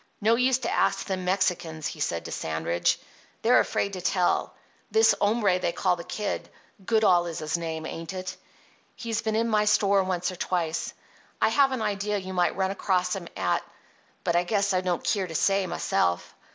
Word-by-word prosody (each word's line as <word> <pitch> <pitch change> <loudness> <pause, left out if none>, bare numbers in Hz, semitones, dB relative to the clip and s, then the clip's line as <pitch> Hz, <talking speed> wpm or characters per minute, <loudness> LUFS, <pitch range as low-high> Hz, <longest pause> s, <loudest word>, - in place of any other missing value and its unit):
"No 220 +2 +3
use 250 +1 +3
to - - -3
ask - - +1
them 185 -2 -3
Mexicans," 180 -4 0
he - - -4
said - - -2
to - - -6
Sandridge. 80 +2 0 0.4
"They're - - +6
afraid 200 - 0
to 185 - -5
tell. 180 0 +1 0.3
This 445 0 +5
hombre 205 -3 +2
they 175 - 0
call 180 +1 +1
the 170 - -8
Kid—Goodall 200 -2 0
is 165 - -5
his 155 +2 -2
name, 160 -2 -4
ain't 165 +1 -6
it?—he's 215 +4 -7
been 220 -1 -1
in 230 +1 +1
my 210 -2 +2
store 200 -1 +4
once 185 0 -1
or 185 - -9
twice. 170 -3 -2 0.4
I 220 - +4
have 270 +4 +4
an 255 -4 -2
idea 205 0 -1
you 190 -1 -6
might 180 -1 +1
run 190 0 +1
across 185 -2 0
him 180 -3 -6
at—but 170 -3 -4
I 175 - +3
guess 200 +1 +1
I 185 - +2
don't 180 -2 -1
keer 195 -3 0
to 160 - -8
say, 195 +2 +2
myself. 85 - 0
185 Hz, 180 wpm, -26 LUFS, 175-210 Hz, 0.4 s, They're